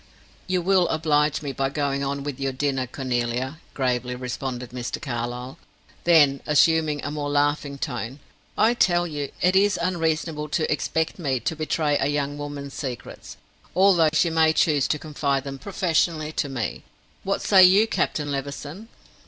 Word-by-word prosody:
"You 185 -2 0
will 185 -1 +3
oblige 155 -2 +1
me 140 - -3
by 135 0 -1
going 140 -1 -1
on 140 0 -2
with 140 -2 -5
your 135 0 -1
dinner, 135 -1 -1
Cornelia," 125 +2 -2 0.2
gravely 125 -2 -1
responded 125 0 -5
Mr. 125 -1 -4
Carlyle. 125 0 -5 0.5
Then 145 -5 +5
assuming 150 0 +3
a 145 - -3
more 145 -1 -3
laughing 145 0 0
tone 125 -3 -4 0.4
"I 225 +2 +4
tell 175 -6 +2
you 145 -4 -4
it 180 +1 +3
is 200 +1 +4
unreasonable 165 -3 -1
to 155 +1 0
expect 160 +3 -1
me 135 -6 0
to 160 - -2
betray 155 -1 0
a - - +1
young 145 0 -2
woman's 145 -1 -6
secrets, 125 -6 -7 0.4
although 185 -4 +5
she 160 +2 +2
may 160 -1 +4
choose 150 -4 +2
to 150 - 0
confide 140 -3 -2
them 135 -1 -7
professionally 165 -4 0
to 145 - -2
me. 125 -5 -3 0.4
What 195 - -1
say 190 -2 +7
you, 190 +4 +7
Captain 150 -8 -1
Levison?" 145 +8 -5
145 Hz, 160 wpm, -24 LUFS, 135-160 Hz, 0.5 s, say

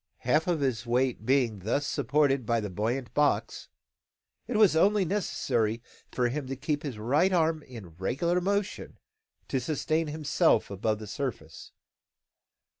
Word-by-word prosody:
Half 150 +7 +2
of 170 -4 0
his 125 -4 -1
weight 125 -2 0
being 125 -6 +2
thus 115 +9 -1
supported 140 0 +1
by 115 +1 +1
the 105 -3 -4
buoyant 115 +7 -2
box, 150 0 0 0.8
it 235 - -1
was 210 -7 +5
only 195 +4 +4
necessary 120 - -1 0.3
for 125 -1 +1
him 140 +1 -4
to 135 - -4
keep 145 +2 -2
his 140 -8 -5
right 145 - +2
arm 160 -3 +2
in 115 -10 -11
regular 170 - 0
motion 200 +2 -2 0.5
to 135 - 0
sustain 155 +4 -1
himself 150 - +1
above 110 +2 -1
the 110 - -8
surface. 105 - -6
135 Hz, 145 wpm, -28 LUFS, 115-160 Hz, 0.8 s, was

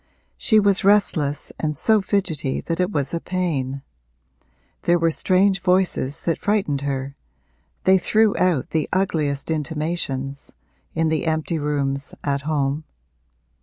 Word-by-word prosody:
She 220 -3 +3
was 200 -2 +3
restless 180 -8 +3
and 150 -2 -2
so 220 +4 +3
fidgety 160 -9 -1
that 165 0 -3
it 180 +2 +1
was 140 -5 -2
a 170 - 0
pain; 140 -8 -2 1.0
there 175 0 +3
were 165 -1 +2
strange 190 +3 +2
voices 180 -7 +1
that 165 - 0
frightened 195 -10 0
her 140 -1 -3 0.7
they 190 0 +5
threw 215 +3 +2
out 175 -8 +1
the 155 -2 -1
ugliest 155 -6 0
intimations 150 -3 -3 0.4
in 165 -1 +1
the 160 +1 -1
empty 160 +1 -1
rooms 140 -1 -2
at 140 -1 -1
home. 145 0 0
160 Hz, 130 wpm, -22 LUFS, 140-185 Hz, 1.0 s, they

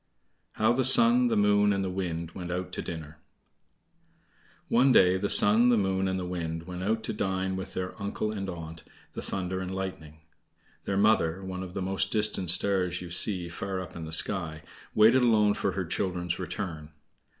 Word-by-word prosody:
How 110 +2 +1
the 130 +2 0
Sun, 125 -1 +7
the 115 -2 0
Moon, 105 0 +3
and 100 -1 -1
the 95 - -3
Wind 85 -3 -4
Went 90 0 -8
Out 90 +1 -4
to - - -4
Dinner 80 -2 -8 1.5
One 130 +3 +3
day 90 -6 +5
the 100 +2 -2
Sun, 110 +4 +6
the 120 - +3
Moon, 95 -1 -1
and 95 0 -2
the 90 - -5
Wind 80 -2 -5
went 90 +1 -8
out 110 +4 -1
to - - -3
dine 95 -2 -2
with 95 - -7
their 90 0 -4
uncle 100 +1 -3
and 100 -2 -5
aunt, 80 -2 -9 0.3
the - - -7
thunder 95 -1 -4
and 95 0 -5
lightning. 80 -5 -7 0.6
Their 100 - -2
mother 95 -4 +1
(one 95 -1 -6
of 95 -1 -9
the 95 - -3
most 95 +1 -1
distant 105 -4 0
stars 90 0 +1
you 85 - -10
see 90 0 +1
far 95 +2 -5
up 90 -3 -9
in 85 -2 -7
the 80 - -9
sky) 80 -2 +1 0.3
waited 115 +4 +5
alone 110 -4 +3
for - - -2
her - - -3
children's 90 -2 -3
return. 85 -5 -6
95 Hz, 190 wpm, -27 LUFS, 90-105 Hz, 1.5 s, Sun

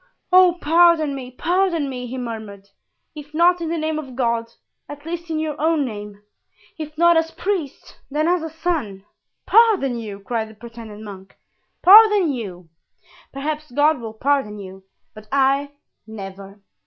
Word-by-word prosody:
"Oh, 365 -1 +6
pardon 330 -2 +4
me, 260 -2 -7
pardon 340 +2 0
me!" 250 -2 -6
he 255 +2 -6
murmured; 220 -5 -7 0.5
"if 300 -1 -11
not 350 +2 +4
in 330 - -3
the 335 - -2
name 310 0 -2
of 265 -5 -9
God, 235 -2 -1 0.4
at 290 0 -10
least 340 0 -6
in 320 - -2
your 310 -1 -2
own 315 -2 +2
name; 210 -3 -8 0.6
if 305 -1 -7
not 340 0 +5
as 325 0 +1
priest, 345 -5 -4
then 300 +3 0
as 335 -2 0
son." 285 - -3 0.4
"Pardon 415 - +4
you!" 210 -3 -7
cried 220 +1 -3
the 220 - -15
pretended 225 -1 -11
monk, 195 -2 -11 0.5
"pardon 410 -3 +7
you! 185 -9 -7 0.6
Perhaps 300 +2 -4
God 290 +3 +2
will 225 -1 -7
pardon 265 -4 0
you, 190 -1 -10 0.3
but 215 0 -13
I, 275 +1 +1 0.3
never!" 195 -1 -10
280 Hz, 155 wpm, -21 LUFS, 220-325 Hz, 0.6 s, pardon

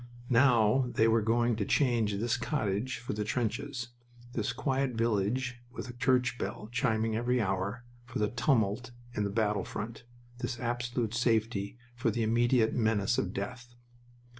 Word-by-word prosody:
Now 125 0 +4
they 110 - +4
were 115 0 +4
going 120 +2 +2
to 105 - 0
change 115 -3 +2
this 115 +4 0
cottage 120 -2 -1
for 115 -1 -5
the 105 0 -2
trenches, 120 +3 -2 0.4
this 110 -3 -1
quiet 135 +1 0
village 115 +3 0
with 125 - -6
a - - -15
church 125 -1 +1
bell 105 +2 -4
chiming 110 -3 +1
every 125 +2 +1
hour, 100 +3 -1 0.2
for - - -5
the 105 -1 +1
tumult 120 -1 +1 0.2
in 105 -3 0
the - - -1
battle 105 0 +1
front 115 +3 -6 0.3
this 120 -1 -3
absolute 120 -1 -2
safety 115 -3 0 0.2
for 120 0 +1
the 115 +1 0
immediate 120 +1 +3
menace 110 -4 +2
of - - -1
death. 120 -1 -6
115 Hz, 155 wpm, -31 LUFS, 110-125 Hz, 0.4 s, Now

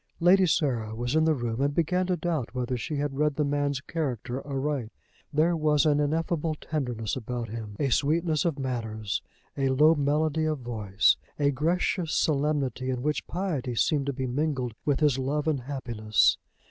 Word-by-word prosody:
Lady 185 +2 +5
Sarah 120 -9 0
was 120 +3 -2
in 160 0 +4
the 160 -1 +3
room, 120 -1 -2
and 140 +1 +1
began 180 +3 +1
to 180 -1 +1
doubt 155 -8 -2
whether 125 0 -1
she 135 +5 -4
had 145 -1 -2
read 150 -1 +2
the 150 - +1
man's 145 -1 0
character 130 -5 -3
aright. 135 -4 -2 0.4
There 160 +3 +3
was 150 -2 +2
an 150 -1 +3
ineffable 160 +1 0
tenderness 125 -9 -3
about 120 -1 -4
him, 110 -2 -6
a 140 - +1
sweetness 155 +2 +2
of 165 -5 0
manners, 110 -5 -3 0.3
a 135 -1 +1
low 150 +5 +5
melody 155 +1 +1
of 155 -1 0
voice, 110 -5 +1 0.2
a 145 -1 +2
gracious 165 +3 0
solemnity 140 -4 0
in 125 -1 -2
which 150 +1 -1
piety 155 -10 -2
seemed 140 +3 +1
to 140 - 0
be 130 0 -3
mingled 130 -2 -1
with 145 0 +1
his 145 -4 +3
love 145 +3 -1
and 150 -4 +1
happiness! 120 -5 +1
140 Hz, 175 wpm, -27 LUFS, 125-155 Hz, 0.4 s, Lady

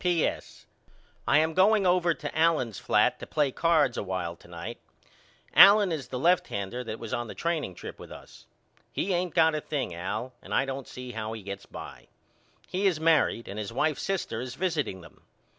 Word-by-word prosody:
P.S. 175 -3 -1 0.6
I - - +5
am 160 +1 +2
going 200 +3 +4
over 175 -2 +3
to - - -7
Allen's 160 - +2
flat - - +2
to - - -8
play 145 -3 +1
cards 155 -5 +2
a - - -1
while 90 -3 -3
to - - -18
night. 85 +7 -7 0.7
Allen 200 -1 +8
is 155 -4 -3
the 130 - -5
left 175 +7 +3
hander 100 +6 -4
that 115 -2 -5
was 115 -2 -7
on 120 0 -2
the - - -8
training 160 - -2
trip - - -9
with - - -11
us. - - -13 0.4
He 195 - -1
ain't 175 -1 -1
got 160 -2 +5
a 155 - -2
thing, 140 - -3
Al, 105 +9 -4
and - - -4
I 135 - +3
don't 135 0 -5
see 125 0 -8
how 110 -1 -4
he 110 -2 -8
gets 100 0 -7
by. - - -10 0.6
He 195 +2 0
is 175 -5 +1
married 160 -7 +2
and 100 - -6
his 105 -1 -4
wife's 150 +5 0
sister 190 -12 -2
is 125 0 -6
visiting 150 - -2
them. 85 - -16
140 Hz, 200 wpm, -28 LUFS, 110-170 Hz, 0.7 s, Allen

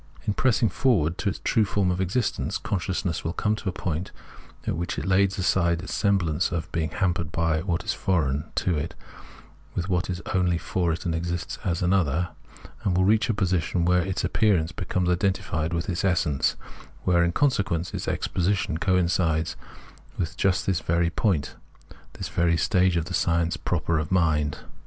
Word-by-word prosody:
In 105 - +1
pressing 120 -1 +2
forward 90 - +1
to - - +1
its - - -4
true 110 - +3
form 95 -2 +1
of 90 +1 -1
existence, 100 +5 -1
consciousness 90 -2 -2
will 80 - -2
come 105 +3 +1
to 100 - -3
a - - -1
point 90 -1 -3 0.5
at - - -1
which 85 +1 -3
it - - -3
lays 95 +1 +3
aside 85 -2 +1
its - - -5
semblance 95 -5 +1
of 85 -2 -3
being 80 -1 -1
hampered 90 -4 -1
with 85 0 +1
what 85 -1 0
is - - -1
foreign 75 -6 0
to 90 - +1
it, 80 +3 -5 0.8
with 90 +1 -2
what 90 0 0
is 90 -1 -2
only 90 -2 +2
for 85 0 -1
it 80 - -4
and 85 - 0
exists 85 +1 -3
as 90 -4 -1
an 90 +2 +3
other; 85 -2 +1 0.5
it - - +1
will 90 +1 +2
reach 110 +4 +3
a - - +3
position 90 -3 0
where 90 0 +4
its 95 +1 -2
appearance 95 -8 +2
becomes 90 +2 -2
identified 90 -3 0
with 85 0 -2
its 90 -3 -2
essence, 85 -7 +1 0.5
where, 85 -1 +3
in 85 - +2
consequence, 90 - 0
its - - -4
exposition 90 -3 0
coin 90 -2 +2
cides 80 -2 0 0.6
with 85 -3 -2
just 95 -1 +1
this 95 -3 +1
very 85 0 +1
point, 90 -7 0 0.6
this - - -5
very 85 -1 +2
stage 90 0 +2
of 80 - 0
the - - -6
science 85 0 +1
proper 85 -2 0
of 75 +2 -4
mind. 75 -5 +1
90 Hz, 185 wpm, -25 LUFS, 85-95 Hz, 0.8 s, where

